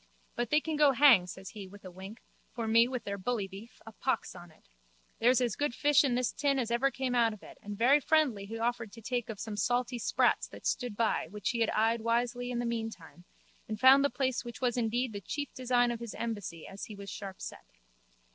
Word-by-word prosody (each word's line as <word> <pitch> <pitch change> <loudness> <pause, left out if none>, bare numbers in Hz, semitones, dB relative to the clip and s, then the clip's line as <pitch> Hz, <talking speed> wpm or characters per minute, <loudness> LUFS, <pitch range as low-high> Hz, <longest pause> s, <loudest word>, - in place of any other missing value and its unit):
But 240 -1 -2
they 300 - +4
can 310 -1 -3
go 295 -2 +5
hang, 250 -9 +6
says 190 +1 -8
he 205 -3 -9
with 200 +1 -14
a 185 - -8
wink, 190 +5 -10 0.3
for 230 -2 -3
me 230 +2 +5
with 250 -1 -4
their 200 0 -4
bully 210 0 -1
beef, 200 +5 -12
a 225 - -9
pox 260 +4 -2
on 175 - -12
it. 155 - -24 0.5
There's 245 +3 +4
as 240 -5 0
good 290 -4 -1
fish 295 0 +4
in 260 -4 +1
this 250 -1 0
tin 280 -1 0
as 235 -3 -1
ever 245 +4 +2
came 265 -2 -3
out 230 -2 +3
of 210 - -13
it - - -13
and 205 0 -7
very 260 +6 +5
friendly 275 -10 +1
he 225 +2 -6
offered 230 -1 -2
to 230 - -11
take 240 -1 -2
of 215 -3 -6
some 220 -2 -5
salty 245 +3 0
sprats - - +2
that - - -13
stood 245 -5 -1
by 230 -1 +1
which 210 0 -2
he 235 - -3
had 225 - +2
eyed 225 +1 +1
wishly 240 +2 0
in 245 - -2
the 240 - -1
meantime 225 -7 -5 0.4
and 215 -1 -4
found 265 +3 +7
the 285 - +3
place 260 -1 -1
which 240 -1 -8
was 245 -2 0
indeed 240 0 0
the 200 - -5
chief 290 +7 -5
design 245 -1 +2
of 235 - -4
his 235 -2 -7
embassy 205 -8 -5
as 195 - -7
he 215 - -9
was 200 0 -8
sharpset. 195 -2 -8
235 Hz, 235 wpm, -31 LUFS, 210-250 Hz, 0.5 s, found